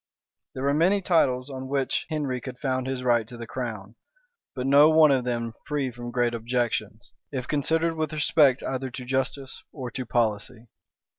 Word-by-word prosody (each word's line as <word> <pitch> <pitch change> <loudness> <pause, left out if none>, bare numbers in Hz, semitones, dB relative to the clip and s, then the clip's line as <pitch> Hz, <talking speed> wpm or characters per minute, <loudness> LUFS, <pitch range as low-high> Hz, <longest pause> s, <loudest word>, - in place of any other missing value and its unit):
There 130 - -4
were 140 +1 +2
many 180 +7 +3
titles 140 -8 +1
on 130 0 -6
which 135 -1 -1
Henry 140 -5 -2
could 130 0 -7
found 130 0 -2
his 130 -1 -3
right 120 -3 +2
to 120 - -10
the 115 - -7
crown; 115 -3 -6 0.6
but 130 -1 -3
no 140 +3 +7
one 155 -2 +6
of 130 -2 +1
them 115 -2 -2
free 145 -3 -1
from 120 0 -7
great 120 -1 0
objections, 115 -3 -2 0.2
if 130 -3 -4
considered 160 +3 +1
with 155 -2 -2
respect 145 -3 +3
either 130 0 -3
to 125 +1 -8
justice 135 +1 -3
or 130 -4 -6
to 130 - -4
policy. 115 0 -1
130 Hz, 175 wpm, -26 LUFS, 120-140 Hz, 0.6 s, no